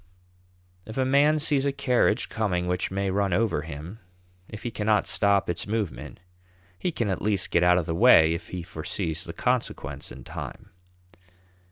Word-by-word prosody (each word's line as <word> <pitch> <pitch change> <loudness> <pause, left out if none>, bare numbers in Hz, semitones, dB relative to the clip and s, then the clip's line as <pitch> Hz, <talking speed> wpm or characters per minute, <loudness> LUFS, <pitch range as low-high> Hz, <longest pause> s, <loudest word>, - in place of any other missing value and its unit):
If 110 - -8
a 130 - +2
man 145 +3 +4
sees 145 -2 +1
a - - +2
carriage 125 -4 +1
coming 90 -5 -1
which 90 0 -1
may 95 0 -1
run 100 -1 0
over 110 -5 +1
him, 80 +7 -8 0.5
if 105 - -9
he 120 - -3
cannot 105 -1 +1
stop 100 -1 +2
its 85 +2 -2
movement, 80 - -4 0.6
he 180 - -1
can 120 -8 -2
at 95 - -2
least 100 -3 0
get 85 - +3
out 90 0 +5
of 90 - 0
the 80 - -2
way 80 -5 +6
if 85 0 -6
he 90 -2 -6
foresees 85 0 -3
the - - -7
consequence 70 0 -2
in - - -10
time. - - -8
100 Hz, 175 wpm, -26 LUFS, 85-115 Hz, 0.6 s, way